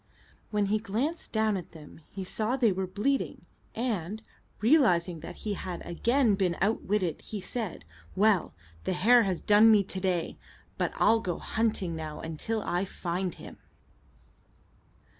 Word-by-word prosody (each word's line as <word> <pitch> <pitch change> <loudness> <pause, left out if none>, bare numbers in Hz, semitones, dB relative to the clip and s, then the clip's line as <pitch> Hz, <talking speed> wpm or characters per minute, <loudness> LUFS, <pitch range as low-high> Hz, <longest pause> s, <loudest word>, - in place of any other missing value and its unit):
When 210 -1 +1
he 210 +2 +1
glanced 240 - -3
down 220 -2 +1
at 180 - -7
them 160 0 -13
he 195 - -6
saw 215 +6 -1
they 235 -5 +4
were 190 0 -2
bleeding, 210 +9 -1 0.3
and, 215 -4 -2 0.4
realizing 190 - +3
that - - -8
he 210 - 0
had 180 -2 -6
again 235 +7 +2
been 185 -3 0
outwitted, 195 -4 0
he 215 - -6
said, 210 - -5 0.3
"Well, 205 -2 +2 0.3
the - - -1
hare 235 +7 +5
has 185 -3 -1
done 210 +2 +6
me 210 -2 +6
to 190 0 -5
day, 180 -3 -1 0.4
but - - +1
I'll 225 +1 +4
go 180 -6 -3
hunting 210 -6 -1
now 155 -1 -6
until 200 +8 -3
I 175 +2 0
find 180 -1 -3
him." - - -11
200 Hz, 150 wpm, -29 LUFS, 180-220 Hz, 0.4 s, done